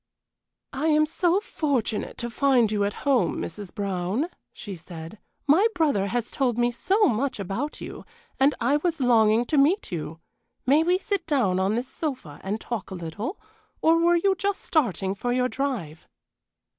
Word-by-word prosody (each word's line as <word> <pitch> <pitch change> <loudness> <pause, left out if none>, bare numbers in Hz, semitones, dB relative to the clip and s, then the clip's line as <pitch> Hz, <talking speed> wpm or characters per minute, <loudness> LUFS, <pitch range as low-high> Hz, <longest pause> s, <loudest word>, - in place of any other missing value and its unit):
"I 280 +4 -1
am 305 -1 +4
so 345 +4 +1
fortunate 280 - -2
to 235 -1 -4
find 250 -4 +3
you 205 -1 +1
at 205 - -5
home, 250 - +2
Mrs. 190 +2 -6
Brown," 200 - -2 0.2
she 200 -4 -8
said. 165 +3 -10 0.3
"My 325 +10 +5
brother 285 - +2
has 235 +2 -2
told 250 -4 0
me 240 0 +2
so 390 - +1
much 255 0 0
about 200 +10 -3
you, - - -7 0.4
and 275 +2 +4
I 270 +5 +2
was 330 +1 -1
longing 230 -2 +4
to 295 +3 +2
meet 330 +9 +2
you. 160 -1 -5 0.5
May 285 +5 +5
we 355 +3 +3
sit 400 -2 -3
down 235 - +2
on 195 +3 +1
this 245 +2 -2
sofa 260 - -5
and 205 +3 -2
talk 235 -3 -5
a 190 - -6
little, 180 - -5 0.4
or 325 +1 +4
were 345 +1 +4
you 385 +3 +3
just 395 +1 -2
starting 195 - 0
for 245 +5 -3
your 250 0 +1
drive?" 235 - -4
245 Hz, 170 wpm, -25 LUFS, 200-305 Hz, 0.5 s, My